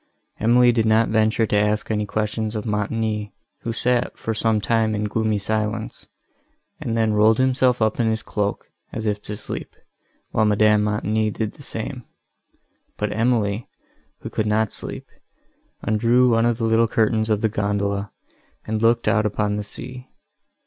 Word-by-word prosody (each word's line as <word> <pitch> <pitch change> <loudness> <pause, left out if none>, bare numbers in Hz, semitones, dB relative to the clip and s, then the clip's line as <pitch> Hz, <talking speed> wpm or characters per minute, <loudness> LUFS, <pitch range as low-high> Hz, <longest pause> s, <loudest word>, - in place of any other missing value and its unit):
Emily 120 +2 +5
did 115 -2 +1
not 110 +1 +3
venture 110 +1 +2
to 105 - -1
ask 105 +2 +1
any 105 -1 -1
questions 110 +1 -2
of 105 - -3
Montoni, 105 -1 -2 0.3
who 115 - -3
sat, 120 +1 0
for 110 - -3
some 110 0 +1
time, 110 0 +1
in 105 - -2
gloomy 110 0 0
silence, 110 +2 -3 0.7
and 115 -1 -2
then 110 -1 +2
rolled 110 +1 +4
himself 130 -2 +2
up 110 +2 0
in 115 -2 +2
his 110 0 -2
cloak, 105 -1 -3 0.2
as 110 - -5
if 105 -1 -1
to 105 - -6
sleep, - - -6 0.6
while 110 - +2
Madame 105 0 +4
Montoni 105 +1 0
did 105 0 -3
the - - -15
same; 125 0 -5 0.9
but - - -2
Emily, 110 -2 0 0.5
who - - -7
could 110 - -1
not 110 0 +1
sleep, - - -5 0.8
undrew 120 +4 +3
one 115 +1 +3
of 120 -1 +1
the 115 - -3
little 115 +1 +3
curtains 110 0 +1
of 105 -1 +1
the 110 - +3
gondola, 100 -1 -1 0.5
and 110 0 -2
looked 115 +1 +3
out 105 -1 +3
upon 105 0 -1
the 105 - -3
sea. 125 +4 -6
110 Hz, 165 wpm, -22 LUFS, 105-115 Hz, 0.9 s, Emily